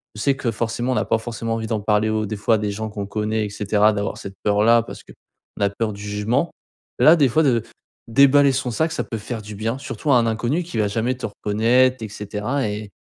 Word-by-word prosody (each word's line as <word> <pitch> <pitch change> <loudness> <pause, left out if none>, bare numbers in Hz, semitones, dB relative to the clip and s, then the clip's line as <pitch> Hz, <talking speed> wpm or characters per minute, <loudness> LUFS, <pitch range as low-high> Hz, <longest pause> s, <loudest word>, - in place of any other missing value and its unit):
Je 105 - -6
sais 140 -1 +2
que, 125 -3 -1
forcément, 115 +3 -2
on - - -1
a - - 0
pas 115 - +1
forcément 115 0 -4
envie 110 0 -4
d'en 110 -1 -2
parler 105 +1 +1
au 110 0 0
des 105 0 -4
fois 110 +2 +2
à - - +1
des 105 -1 -2
gens 110 +2 -4
qu'on 105 -1 -5
connaît 105 +1 -1
et 105 - -5
cetera. 105 +1 +2
D'avoir 100 -1 -3
cette 100 -1 -8
peur-là 110 +3 +4
parce - - -10
que - - -16 0.5
la 100 - +2
peur 110 +2 -3
du 100 - -10
jugement. 105 +9 -1 0.5
Là, 155 +3 +7
des 145 -4 +4
fois, 155 +7 +2
de 120 -6 +3 0.5
déballer 140 +3 +5
son 125 -1 -1
sac 160 +7 0
ça - - -2
peut 115 - -5
faire 110 +2 -5
du 105 +1 -8
bien 115 +4 -2
surtout 145 +1 -3
à 125 - +6
un 120 - +2
inconnu 120 +9 -1
qui 170 -8 -7
va 105 - +2
jamais 115 +5 -1
te 130 - -5
reconnaître 115 +5 +2
et 110 - -5
cetera 105 +6 -3
et 105 0 -5
110 Hz, 250 wpm, -21 LUFS, 105-125 Hz, 0.5 s, Là